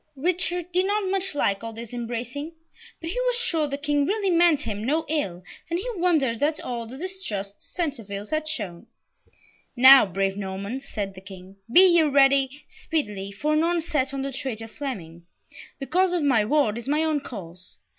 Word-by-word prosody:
Richard 355 +3 0
did 365 +2 +2
not 410 -1 0
much 385 -4 +1
like 200 -7 0
all 225 0 -6
this 230 +1 -9
embracing; 245 +6 -5 0.5
but 330 0 -5
he - - -3
was - - +3
sure 330 -10 +2
the 280 0 -3
King 290 -1 0
really 400 -1 0
meant 335 -3 +4
him 210 -5 -3
no 305 +7 0
ill, 190 - -2 0.3
and 340 - 0
he 380 - -4
wondered 315 - +1
at 300 +2 +1
all 235 -2 -5
the 255 +4 -8
distrust 225 - -3
the - - -28
Centevilles 220 - -5
had 310 0 -1
shown. 205 - -4 0.9
"Now, 260 -1 +8
brave 195 +1 -1
Normans," 200 +7 -5
said 200 -3 -4
the 185 - -12
King, 190 0 -12
"be 355 - +9
ye 345 -3 +6
ready 275 -1 +3
speedily, 205 -11 -4
for 295 +10 -1
an 305 - +3
onset 320 -5 0
on 275 -1 -4
the 275 - -3
traitor 235 -4 -5
Fleming. 175 - -7 0.5
The 275 - -4
cause 365 +4 +2
of 345 -4 0
my 250 -7 +3
ward 235 -4 +1
is 240 - -7
my 300 +3 +1
own 310 -2 +1
cause. 185 -8 -9
275 Hz, 185 wpm, -24 LUFS, 210-325 Hz, 0.9 s, be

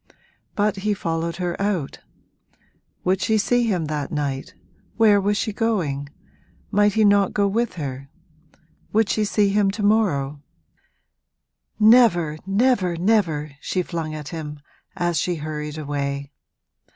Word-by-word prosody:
But 205 0 +1
he 205 +2 0
followed 165 -2 -2
her 175 -1 -2
out: 190 -9 -2 1.0
would 185 +1 +1
she 220 +3 +2
see 240 +3 +2
him 180 -7 0
that 150 -2 -3
night? 145 +3 -3 0.4
Where 210 -3 +5
was 205 +1 +1
she 215 -2 -2
going? 170 -12 -1 0.6
might 205 0 +3
he 220 0 +3
not 200 -1 +3
go 205 -1 +3
with 225 +1 -1
her? 135 -4 -6 0.8
would 220 0 +2
she 215 - +1
see 205 -1 +2
him 200 0 +2
to 205 +2 -3
morrow? 150 -10 +1 1.4
'Never, 210 -9 +5
never, 195 -4 +2
never!' 170 -6 +1
she 185 - -1
flung 160 -3 -4
at 150 -1 -7
him 150 -3 -6 0.4
as 175 -3 0
she 175 +2 -1
hurried 150 -1 -5
away. 140 -1 -3
180 Hz, 135 wpm, -22 LUFS, 150-210 Hz, 1.4 s, Where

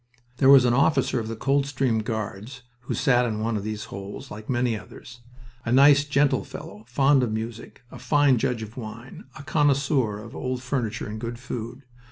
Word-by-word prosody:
There 135 - +4
was 135 -2 +8
an 120 - +3
officer 135 -1 +2
of 110 - -4
the 115 - -4
Coldstream 135 -3 0
Guards 110 +3 -5 0.2
who 120 - -4
sat 125 -4 +3
in 110 -3 -2
one 115 +1 -1
of 100 - -3
these 110 0 -4
holes, 100 0 -8
like 105 +1 -9
many 120 -2 +1
others. 115 +3 -11 0.4
A 120 - -3
nice, 140 +2 +6
gentle 145 0 +2
fellow, 105 - -10
fond 135 +2 +3
of 120 -3 -1
music, 110 +2 -6
a - - -10
fine 145 -4 +3
judge 115 0 -1
of 110 +3 -10
wine, 115 +2 -9
a - - -9
connoisseur 140 -7 +1
of 115 - -11
old 130 0 -3
furniture 125 -4 -2
and 110 +1 -6
good 120 0 -5
food. 125 +1 -7
125 Hz, 190 wpm, -25 LUFS, 110-135 Hz, 0.4 s, was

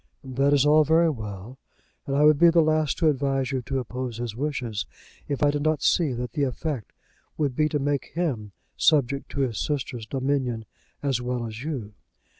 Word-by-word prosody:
"That 135 +1 +1
is 145 -1 +4
all 155 +1 +6
very 160 +2 +4
well; 110 0 -8 0.5
and 140 - -1
I 145 - +4
would 150 -1 +6
be 170 - +8
the 165 -1 +5
last 155 -1 +1
to 165 - +2
advise 135 -2 +1
you 130 -1 -1
to 135 +2 -3
oppose 125 -1 -4
his 120 -2 -4
wishes 120 -7 -3 0.4
if 140 0 -2
I 145 - +5
did 145 0 -2
not 155 -2 +1
see 165 -6 +3
that 125 -1 -4
the 145 - -2
effect 135 -2 -2 0.5
would 145 -5 0
be 155 +2 +2
to 150 - 0
make 145 0 -1
him 130 - -2 0.2
subject 140 -3 +2
to 140 - -1
his 125 -5 -1
sisters' 130 -6 -3
dominion 130 -3 -1 0.4
as 135 -4 0
well 125 -1 -2
as 115 +2 -7
you. 130 -9 -4
135 Hz, 195 wpm, -25 LUFS, 125-150 Hz, 0.5 s, be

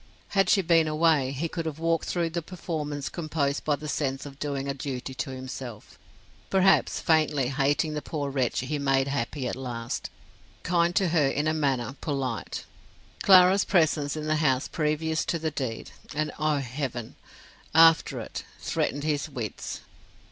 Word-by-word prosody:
Had 195 -1 +2
she 195 - +4
been 165 -2 +4
away, 155 -3 +3
he 140 +5 -2
could 165 0 -4
have 155 -2 -4
walked 165 0 0
through 170 -2 -1
the 170 +1 -2
performance 155 -5 -4
composed 155 -4 -2
by 150 - +2
the 150 +1 -8
sense 135 -2 -2
of 140 -1 -10
doing 140 -2 -2
a 140 - -1
duty 130 -1 -5
to 130 - -4
himself; 125 - -8 0.5
perhaps 195 0 +3
faintly 155 -5 +2
hating 145 +3 +1
the 150 - -3
poor 145 -3 -3
wretch 130 -4 0
he 145 +4 -3
made 135 -1 +2
happy 135 0 -2
at - - -2
last, 120 -3 -4 0.5
kind 175 0 +2
to 190 -3 +3
her 155 -4 +3
in 145 +3 0
a 155 - +2
manner, 135 -4 0
polite. 135 -6 -3 0.6
Clara's 190 0 +7
presence 155 -5 +2
in 155 - -4
the 155 0 +1
house 135 -4 +2
previous 155 0 0
to 170 - -1
the 160 -1 -2
deed, 130 -6 -4 0.2
and, 155 0 -1
oh, 155 -1 +2
heaven! 130 -3 -4 0.6
after 165 0 +6
it, - - -6 0.2
threatened 145 +1 -1
his 150 -1 -1
wits. 120 -8 -5
150 Hz, 165 wpm, -27 LUFS, 135-160 Hz, 0.6 s, Clara's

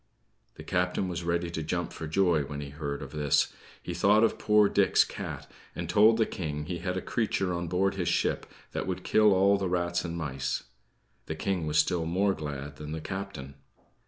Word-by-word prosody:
The - - -10
captain 90 +1 0
was 90 -1 -4
ready 85 0 -1
to 80 - -3
jump 85 +2 -2
for 80 - -6
joy 85 -1 +3
when 70 +1 -5
he 70 -1 -6
heard 70 -1 -4
of 70 - -9
this. 75 -2 +1 0.3
He - - -4
thought 105 +2 +4
of 115 - +2
poor 105 -1 +5
Dick's - - +4
cat, - - -6 0.3
and 85 - -4
told 105 +6 +5
the 110 - +3
King 75 -6 -4
he 85 +1 -4
had 90 +1 -2
a - - -3
creature 95 -5 0
on 85 0 -3
board 95 +3 +1
his 90 -3 -2
ship - - 0 0.2
that - - -3
would 95 -1 -3
kill 105 -1 +4
all 100 +1 +4
the 95 -2 -1
rats 85 -1 0
and 85 -1 -4
mice. 70 -4 -2 0.6
The 80 - -3
King 90 -1 -1
was 75 0 0
still 80 +1 +2
more 95 +4 +2
glad 75 -3 -6
than 75 0 -6
the 80 - -3
captain. 80 -5 -6
85 Hz, 205 wpm, -29 LUFS, 75-95 Hz, 0.6 s, poor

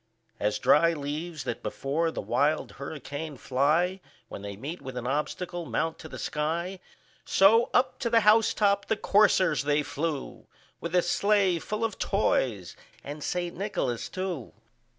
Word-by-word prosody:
As 105 0 0
dry 160 +6 +4
leaves 155 +2 -4
that 120 - -4
before 155 +5 -1
the - - -5
wild 150 +2 +1
hurricane 145 0 -6
fly, 155 +10 +1 0.3
When - - -7
they 100 0 -6
meet 145 - -6
with 130 -2 -7
an 125 - -4
obstacle, 165 +5 -2
mount 165 0 -1
to 160 - -9
the - - -8
sky, 170 +5 -2 0.4
So, 225 +5 +5
up 260 - +2
to 235 - -1
the 230 0 +4
house 220 +1 +5
top 200 -1 +2
the 220 - +1
coursers 195 -7 +3
they 145 +1 +2
flew, 145 0 -4 0.3
With 170 +1 -4
a 180 - +4
sleigh 195 -1 +2
full 215 +6 -4
of 225 -3 -2
toys 120 - 0 0.3
and 145 +1 -7
St. 175 -1 -2
Nicholas 180 - -2
too. 185 -9 -4
165 Hz, 155 wpm, -28 LUFS, 145-190 Hz, 0.4 s, So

